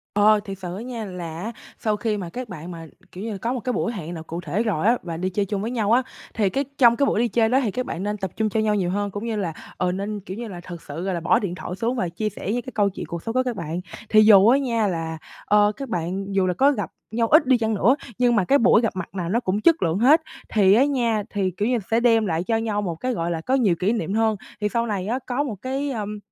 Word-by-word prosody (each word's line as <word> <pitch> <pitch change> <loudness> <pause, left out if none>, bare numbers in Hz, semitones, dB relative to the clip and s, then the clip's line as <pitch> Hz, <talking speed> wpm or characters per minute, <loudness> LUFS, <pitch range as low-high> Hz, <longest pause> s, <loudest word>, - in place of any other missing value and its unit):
Ờ, 210 +1 +5
thiệt 195 -2 -7
sự 180 -1 -6
á 210 - -6
nha 240 -2 -5
là 175 -4 -6
á, 220 +5 -4 0.3
sau 215 -2 0
khi 215 0 -1
mà 185 -4 -5
các 250 -1 -5
bạn 175 -2 -8
mà, 165 -2 -8 0.3
kiểu 185 +3 -7
như 225 - -3
là, 200 - -5
có 230 +5 -2
một 255 - -2
cái 250 +3 -2
buổi 235 - -1
hẹn 175 -6 -6
nào 160 - -6
cụ 165 +2 -5
thể 190 +4 -1
rồi 205 -6 0
á, 235 +2 +5
và 170 -2 -5
đi 185 +3 -2
chơi 200 +2 0
chung 200 0 -2
với 225 - -2
nhau 225 -4 0
á, 250 +2 +5 0.3
thì 205 -4 +1
cái 275 +8 0
trong 235 -2 +6
cái 280 - +2
buổi 220 - +1
đi 240 - +2
chơi 225 -1 +2
đó 260 +3 +3
thì 225 - 0
các 255 +5 -3
bạn 170 - -4
nên 210 +1 -2
tập 190 -3 -4
trung 220 -1 +1
cho 220 - +1
nhau 215 -1 +2
nhiều 185 -4 0
hơn. 205 +2 -1
Cũng 205 +3 -5
như 230 -2 -2
là, 185 -5 -2 0.2
ờ, 180 0 0
nên, 205 +2 -3
kiểu 190 0 -8
như 235 0 -5
là, 180 -4 -7
thực 175 -1 -9
sự, 150 +4 -7
gọi 190 -1 -1
là, 170 - -2
bỏ 170 - +3
điện 190 -4 -3
thoại 180 0 -6
xuống 230 +6 -1
và 185 -7 -1
chia 195 +6 -2
sẻ 205 0 -4
những 245 +1 -1
cái 260 - -9
câu 205 -2 +3
chuyện - - -7
cuộc 170 -1 -6
sống 225 - -4
của 255 - +3
các 245 -3 -2
bạn. 170 -1 -4 0.3
Thì 215 - +6
dù 205 -1 +8
á 260 +4 +6
nha 235 -6 0
là, 165 -3 -3 0.3
ơ, 210 0 +4
các 275 +2 -6
bạn 185 +1 -2
dù 190 -1 +3
là 180 - 0
có 275 +6 +4
gặp - - -3 0.2
nhau 230 0 0
ít 310 +1 +6
đi 255 -1 +4
chăng 220 -1 0
nữa 225 +7 +4 0.2
nhưng 245 -1 +3
mà 200 - +3
cái 275 +10 +4
buổi 225 - +5
gặp 225 -4 -1
mặt 180 0 -6
nào 180 -3 -3
nó 225 +7 +1
cũng 200 -2 -1
chất 330 +8 +4
lượng 165 +2 +1
hết, 280 +9 +6 0.3
thì 200 -3 +4
á 245 +5 +5
nha 240 -6 +1
thì, 195 -3 0
kiểu 205 +5 -2
như, 250 -1 +2
sẽ 225 +1 +3
đem 225 -2 +4
lại 165 -2 0
cho 225 +3 +1
nhau 220 -2 -1
một 175 -4 -2
cái, 255 +10 -2
gọi 170 -4 -2
là 165 -1 -2
có 255 +11 0
nhiều 225 -10 +3
kỷ 195 +4 +1
niệm 220 -4 -2
hơn. 220 -1 +2 0.2
Thì 210 - +1
sau 235 +2 0
này 200 -4 -2
á, 240 +4 0
có 255 +3 0
một 250 -8 -4
cái, 270 +2 -2
ưm, 210 -4 -4
210 Hz, 310 wpm, -23 LUFS, 185-235 Hz, 0.3 s, dù